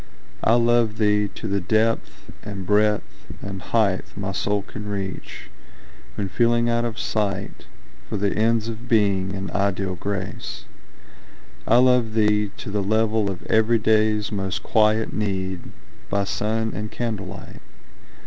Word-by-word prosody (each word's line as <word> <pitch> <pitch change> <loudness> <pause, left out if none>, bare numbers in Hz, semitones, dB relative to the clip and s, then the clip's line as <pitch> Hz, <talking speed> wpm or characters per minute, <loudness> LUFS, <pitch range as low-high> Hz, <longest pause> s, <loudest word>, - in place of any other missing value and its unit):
I 115 - +5
love 120 -2 +3
thee 105 -1 +3
to 110 - -7
the 100 -1 0
depth 110 +4 0
and 100 -2 -6
breadth 105 +1 +1
and 95 -1 -6
height 100 -1 0
My 95 -1 -3
soul 100 +2 0
can 105 0 -8
reach, 95 -2 -5 0.6
when 100 - -2
feeling 120 +4 +2
out 120 0 +1
of 115 -2 -3
sight 100 -3 -2 0.4
For - - -2
the 100 0 0
ends 115 0 +2
of 115 +1 -6
Being 100 -4 +2
and 95 0 -5
ideal 95 -1 0
Grace. 95 0 -5 1.0
I 115 - +6
love 125 -3 +4
thee 105 -1 +3
to - - -6
the 105 0 0
level 110 +1 +1
of 95 -3 -6
everyday's 110 -1 +3
Most 95 -2 -2
quiet 110 0 +2
need, 95 -3 -3 0.4
by 100 0 +1
sun 110 +2 -1
and 105 0 -4
candlelight. 100 -6 -5
105 Hz, 140 wpm, -23 LUFS, 100-110 Hz, 1.0 s, I